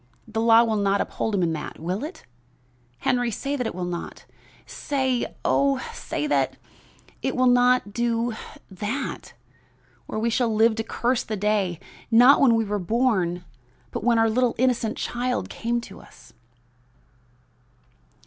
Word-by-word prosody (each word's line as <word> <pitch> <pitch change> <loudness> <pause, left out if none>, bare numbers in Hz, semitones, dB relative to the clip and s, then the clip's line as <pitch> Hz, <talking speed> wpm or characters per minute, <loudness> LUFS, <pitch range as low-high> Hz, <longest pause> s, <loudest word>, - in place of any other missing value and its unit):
The 225 - -2
law 230 0 +6
will 220 -2 0
not 200 0 +1
uphold 220 - -2
him 185 - +1
in 165 -1 +1
that; 150 -1 -6
will 180 - -3
it, 315 +5 -8 0.8
Henry? 245 -1 +1
Say 275 +6 -3
that 250 -4 -2
it - - -5
will 180 -1 -3
not, 175 -1 -6 0.4
say 265 -3 -1 0.2
oh, 275 -1 +3 0.2
say - - -4
that 295 - 0 0.6
it 265 - -1
will 255 - +2
not 245 -3 +3
do 235 0 0 0.4
that, 210 +9 -4 0.7
or - - -5
we 230 +2 0
shall 235 -1 +1
live 220 +1 +4
to 225 - -1
curse 240 +2 0
the 215 - -4
day, 195 -4 0 0.3
not 245 +5 +7
when 245 -5 +5
we 225 -1 +1
were 205 0 -2
born; 185 -4 0 0.5
but - - -4
when 235 0 +3
our 225 0 +4
little 245 +2 +1
innocent 240 -3 +1
child 250 +1 -2
came 235 +1 -1
to 195 -4 -11
us!" - - -18
230 Hz, 155 wpm, -24 LUFS, 205-250 Hz, 0.8 s, not